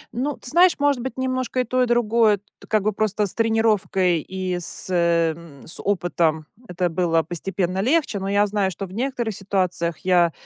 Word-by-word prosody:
Ну, 275 +4 -2
ты - - -12
знаешь, 350 +2 +6
может 285 -3 +1
быть, 260 +2 -5
немножко 255 -1 -1
и - - 0
то, 255 +1 0
и 250 - +2
другое, 230 -3 +3 0.3
как 215 -2 +2
бы 215 - +1
просто 210 0 0
с 195 - -5
тренировкой 210 -6 +2
и 185 0 -4
с, 170 - -4
э, 170 -2 +2
м, 165 -5 -14
с - - -8
опытом 170 -5 0 0.2
это 180 0 -1
было 165 -1 +1
постепенно 180 +2 -3
легче. 260 -2 +1
Но 195 +1 -3
я 205 +1 +3
знаю, 205 -2 0
что 195 +2 -6
в 185 - -12
некоторых 240 -1 -2
ситуациях 185 -4 -1
я, 175 -2 +4
195 Hz, 190 wpm, -22 LUFS, 175-235 Hz, 0.3 s, знаешь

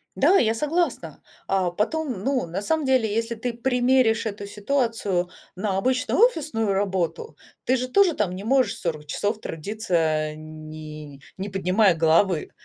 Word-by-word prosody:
Да, 390 - +5
я 220 - +3
согласна. 325 +7 -1 0.3
А 190 -2 +1
потом, 240 - -2
ну, 265 -4 0
на 175 +4 -4
самом 310 +7 0
деле, 255 -5 +2
если 230 +1 -1
ты 235 +2 -3
примеришь 245 -1 +2
эту 205 -2 -5
ситуацию 205 -5 -1 0.3
на 190 0 -1
обычную 255 - 0
офисную 305 - +2
работу, 195 - -2 0.3
ты 255 - +2
же 255 +1 -2
тоже 365 +6 +4
там 185 -4 -1
не 190 - -7
можешь 240 -2 +2
40 155 -4 -3
часов 205 +8 -2
трудиться 205 +4 -6
а, 155 -2 +1
не 155 -2 -10 0.2
не 195 +2 -4
поднимая 190 0 +3
головы. 165 +1 +2
210 Hz, 150 wpm, -24 LUFS, 180-255 Hz, 0.3 s, Да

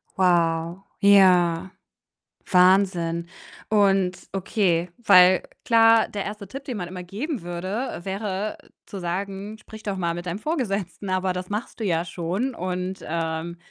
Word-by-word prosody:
Wow, 170 -1 +1 0.2
ja. 185 -3 +5 0.8
Wahnsinn 180 -2 +3 0.4
und 195 -3 +3 0.2
okay, 180 -3 0
weil 185 -5 +6 0.2
klar, 225 -1 +5
der 200 -2 -4
1. 210 0 -6
Tipp, 270 +8 -9
den 255 - -4
man 175 -4 -5
immer 180 0 -7
geben 225 - -4
würde, 185 +8 -4
äh, - - -8
wäre, 200 +1 -3
äh, - - -24 0.2
zu 200 - -8
sagen: 195 +4 -4
„Sprich 220 0 -12
doch 200 -2 -2
mal 170 -3 -1
mit 175 +1 -6
deinem 180 +3 -4
Vorgesetzten”, 200 - -3
aber 185 0 0
das 180 0 -5
machst 210 +4 -5
du 220 - -2
ja 170 -3 +1
schon, 180 +9 -3
und, 185 -1 -4
ähm, 165 +1 -3
185 Hz, 150 wpm, -24 LUFS, 175-205 Hz, 0.8 s, weil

